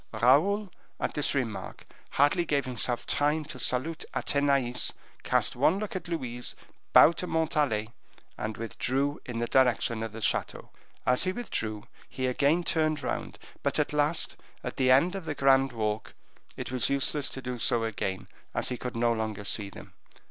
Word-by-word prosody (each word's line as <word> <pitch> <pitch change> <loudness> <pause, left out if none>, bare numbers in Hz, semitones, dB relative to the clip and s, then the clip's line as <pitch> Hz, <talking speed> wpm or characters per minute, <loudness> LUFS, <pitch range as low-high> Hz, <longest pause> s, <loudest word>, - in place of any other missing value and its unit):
Raoul, 165 - +3 0.3
at - - -2
this 150 0 0
remark, 115 -7 -3 0.2
hardly 145 +6 +3
gave 145 -4 0
himself 125 -1 0
time 150 +2 +1
to - - -9
salute 155 +6 0
Athenais, 140 -4 +1 0.3
cast - - +1
one 180 - +3
look 205 -1 -4
at 180 -3 -4
Louise, 125 -8 -2 0.4
bowed 165 - +7
to 180 - -2
Montalais, 150 -10 0 0.4
and 110 0 -4
withdrew 135 +5 -1
in 120 -2 -4
the 120 - 0
direction 120 -3 +2
of 115 -1 -4
the 115 - -8
chateau. 110 - -1 0.3
As 125 +8 +3
he 185 - +1
withdrew 110 - -4 0.3
he 130 - -3
again 145 +7 +2
turned 155 -3 +1
round, - - -3 0.2
but - - 0
at - - 0
last, 150 +3 +1 0.3
at - - -5
the 130 -1 +2
end 140 +8 +5
of 195 -4 -5
the 155 -2 -3
grand 135 -1 +4
walk, 110 -2 -3 0.4
it - - -5
was 130 -1 +1
useless 140 +1 +2
to - - -6
do 125 -1 -5
so 115 0 +2
again, 95 -4 -3 0.3
as - - +1
he 125 - -3
could 125 -1 -5
no 120 0 +2
longer 110 -2 -3
see 100 0 -1
them. - - -12
130 Hz, 170 wpm, -28 LUFS, 115-155 Hz, 0.4 s, bowed